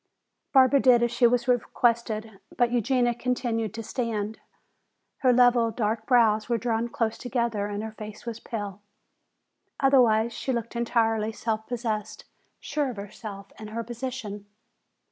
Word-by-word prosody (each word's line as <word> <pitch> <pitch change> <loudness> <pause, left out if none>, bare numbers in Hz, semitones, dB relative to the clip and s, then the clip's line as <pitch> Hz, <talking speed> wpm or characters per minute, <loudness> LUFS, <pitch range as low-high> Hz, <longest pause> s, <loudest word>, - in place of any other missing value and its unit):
Barbara 265 0 +6
did 245 -2 +5
as 240 - +1
she 240 0 +4
was 245 +2 +1
requested. 230 -3 0 0.2
But 240 -1 +3
Eugenia 245 +1 +2
continued 235 -3 -1
to 225 - -5
stand. 220 -3 -3 0.8
Her 255 -2 +4
level, 245 -1 +4
dark 220 0 -2
brows 225 -4 +3
were 235 - +2
drawn 230 +1 -1
close 225 -1 -2
together 235 -5 -1
and 205 +1 -4
her 220 - -5
face 215 0 -10
was 235 -1 -5
pale. 205 -4 -6 1.0
Otherwise 235 -5 +4
she 265 - -3
looked 235 -1 -3
entirely 225 -2 +1
self 220 -1 -3
possessed, 220 -3 -3 0.3
sure 295 -2 -2
of 245 - -6
herself 200 0 -8
and 215 -1 -8
her 230 +2 -4
position. 230 -4 -6
230 Hz, 145 wpm, -26 LUFS, 215-245 Hz, 1.0 s, Barbara